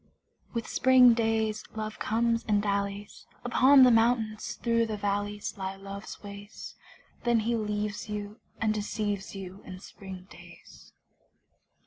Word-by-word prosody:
With 230 -1 -3
spring 255 -2 +6
days 220 -1 0
Love 215 0 -5
comes 230 +1 +1
and 210 -1 +3
dallies: 200 0 -3 0.2
Upon 260 +3 +6
the 250 - +7
mountains, 225 -2 +1
through 230 -1 +1
the 215 -1 -3
valleys 205 0 -2
Lie 190 0 -3
Love's 195 +2 -9
ways. 200 0 -9 0.5
Then 235 -2 +3
he 235 +2 0
leaves 210 -1 -3
you 210 0 -5 0.2
and 220 -1 +1
deceives 205 -2 -3
you 190 0 -8
In 185 -1 -9
spring 190 -1 -10
days. - - -15
210 Hz, 130 wpm, -28 LUFS, 200-230 Hz, 0.5 s, the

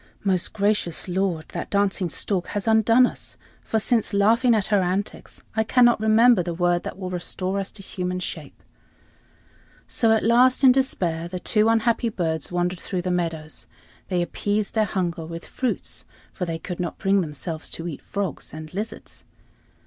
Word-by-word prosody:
"Most 185 -3 0
gracious 205 -5 0
lord, 180 -3 -1
that - - -5
dancing 200 -3 +1
stork 180 +3 -1
has 205 +1 -3
undone 225 +3 +5
us, - - -6 0.2
for, 225 - -1
since 220 -1 +1
laughing 230 +4 +4
at 210 -3 +1
her 200 - +5
antics, 185 +3 -3
I 220 - +2
cannot 240 +1 +4
remember 220 0 +5
the 170 -1 -4
word 175 0 +2
that - - -5
will 185 -1 -5
restore 185 +2 -2
us 195 - -3
to 200 - -9
human 180 -1 -3
shape." - - -7 1.2
So 225 -2 +2
at 220 - +3
last, 250 +4 +4
in 260 - +9
despair, 175 -11 0
the 180 +1 -5
two 215 +4 +2
unhappy 230 +1 +2
birds 165 -7 -2
wandered 175 0 -1
through 180 0 -3
the 180 - -1
meadows. 165 -3 -3 0.4
They 180 -2 0
appeased 205 +3 -2
their 220 -1 +2
hunger 175 -4 -2
with 165 +1 -7
fruits, 255 -2 -3 0.3
for 180 - -3
they 165 -1 -3
could 175 +2 -7
not 175 -3 -3
bring 195 0 +2
themselves 160 0 -5
to 165 - -5
eat 160 - -6
frogs 195 -7 -4
and 155 +1 -9
lizards. 210 +4 -6
190 Hz, 170 wpm, -24 LUFS, 175-220 Hz, 1.2 s, in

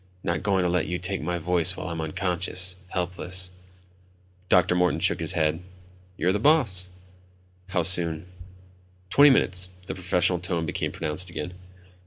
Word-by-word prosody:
"Not 85 -2 -1
going 95 -3 +1
to - - +2
let 90 +1 0
you 90 - -2
take 95 +2 -2
my 85 +3 -2
voice 90 +1 +2
while 90 - -5
I'm 85 -1 -3
unconscious... 90 +2 -1
helpless 90 0 -2 0.5
..." 90 0 -33
Dr. 90 -1 +4
Morton 90 0 +2
shook - - +3
his - - -1
head. 80 -1 +1 0.6
"You're 90 - +2
the 105 - 0
boss." 110 - +2 0.8
"How 90 -2 0
soon?" 85 -2 +1 0.9
"Twenty 145 +1 +7
minutes." 95 -8 +2 0.2
The - - -4
professional 90 -1 +1
tone 85 -2 -2
became - - -2
pronounced 80 +3 -3
again. 85 +1 -5
90 Hz, 155 wpm, -25 LUFS, 85-95 Hz, 0.9 s, Twenty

